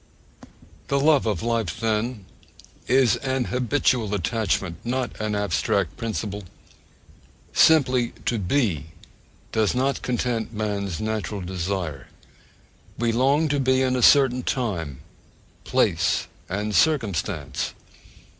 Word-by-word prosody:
The 140 - +1
love 145 -4 +4
of 100 -6 -1
life, 115 -8 -1
then, 110 -1 -1 0.6
is 130 -4 +4
an 130 -1 -1
habitual 125 -4 +1
attachment, 100 -3 -1
not 125 +1 -2
an 105 -1 -1
abstract 100 -3 0
principle. 105 -3 -4 1.1
Simply 130 -6 +4
to 115 - 0
be 95 - 0 0.6
does 110 +1 +1
not 135 +2 0
'content 120 -2 -2
man's 100 -5 -2
natural 110 -2 -3
desire': 90 -5 -3 0.9
we 120 0 +1
long 135 +7 +3
to 145 0 +1
be 130 0 +2
in 130 0 +1
a 125 - 0
certain 130 -1 +5
time, 90 - -3 0.6
place, - - +1 0.2
and 105 +3 -2
circumstance. 115 - 0
115 Hz, 110 wpm, -24 LUFS, 100-130 Hz, 1.1 s, certain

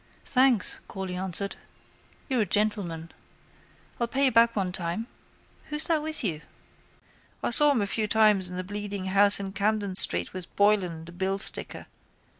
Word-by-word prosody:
—Thanks, 255 -5 +1
Corley 190 -2 -7
answered, 190 +1 -4 0.7
you're 255 -4 -1
a - - 0
gentleman. 200 -6 -3 0.9
I'll 235 - -1
pay 275 +4 -1
you 265 - +2
back 230 0 +3
one 190 -3 -2
time. 180 +4 -4 0.6
Who's 300 0 -3
that 325 -3 0
with 310 -2 -4
you? 165 -7 -3 1.0
I - - -1
saw 295 +5 +8
him 240 -7 0
a - - -1
few 215 +2 -3
times 210 -4 +2
in 180 - -8
the 185 - -4
Bleeding 205 0 -6
Horse 200 +2 +5
in 195 -1 -6
Camden 205 -2 -2
street - - +5
with 185 -2 -10
Boylan, 190 -6 0
the 170 - -12
billsticker. 190 +3 0
200 Hz, 160 wpm, -25 LUFS, 185-230 Hz, 1.0 s, saw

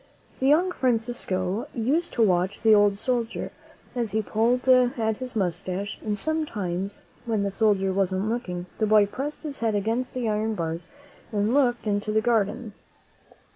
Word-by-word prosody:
The 265 - +1
young 340 +6 +4
Fran 255 -7 +2
cisco 205 -4 -3
used 285 +10 0
to 230 - +3
watch 185 0 +1
the 220 -1 +6
old 205 -1 +4
soldier 235 0 -2 0.4
as 230 -5 -2
he 220 0 +1
pulled 235 +5 +1
at 245 -4 +3
his 255 -2 -7
mustache, 190 +1 -2
and 210 -1 -1
sometimes, 200 - -3 0.2
when 220 -3 +1
the 200 - -1
soldier 195 -3 +2
wasn't 190 +1 0
looking, 190 -7 -3
the 215 - +2
boy 210 -1 +6
pressed 275 +10 -5
his 290 -3 -5
head 225 -2 0
against 225 +6 -1
the 250 -2 -1
iron 215 +1 0
bars 165 -1 -3 0.5
and 210 +2 +1
looked 245 -5 +2
into 205 0 -1
the 215 - +3
garden. 220 0 0
220 Hz, 165 wpm, -25 LUFS, 200-245 Hz, 0.5 s, the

